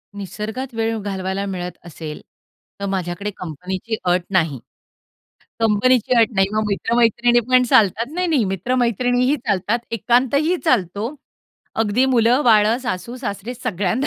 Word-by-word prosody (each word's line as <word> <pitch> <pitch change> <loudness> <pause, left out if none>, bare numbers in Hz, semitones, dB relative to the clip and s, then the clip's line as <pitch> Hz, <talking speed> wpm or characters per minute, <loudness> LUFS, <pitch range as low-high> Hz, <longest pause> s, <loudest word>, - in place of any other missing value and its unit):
निसर्गात 215 +6 -5
वेळ 225 0 0
घालवायला 195 0 -3
मिळत 180 -2 -4
असेल, 160 -2 -8 0.6
तर 200 - -3
माझ्याकडे 195 +1 -3
कंपनीची 185 +6 -4
अट 180 0 +2
नाही. 160 -8 +1 1.0
कंपनीची 225 +3 +3
अट 225 - +3
नाही, 195 0 +3
मग 215 0 0
मित्र-मैत्रिणी 235 +3 +2
पण 255 0 +5
चालतात, 220 +2 +4
नाही, 360 +1 0
नाही, 300 -9 +2
मित्र-मैत्रिणीही 245 - +1
चालतात, 210 -3 -1
एकांतही 260 - +2
चालतो. 220 - 0 0.7
अगदी 225 +4 +2
मुलं-बाळं, 230 -2 +4
सासू-सासरे 240 0 -4
सगळ्यांना 205 +2 -1
220 Hz, 115 wpm, -20 LUFS, 190-245 Hz, 1.0 s, पण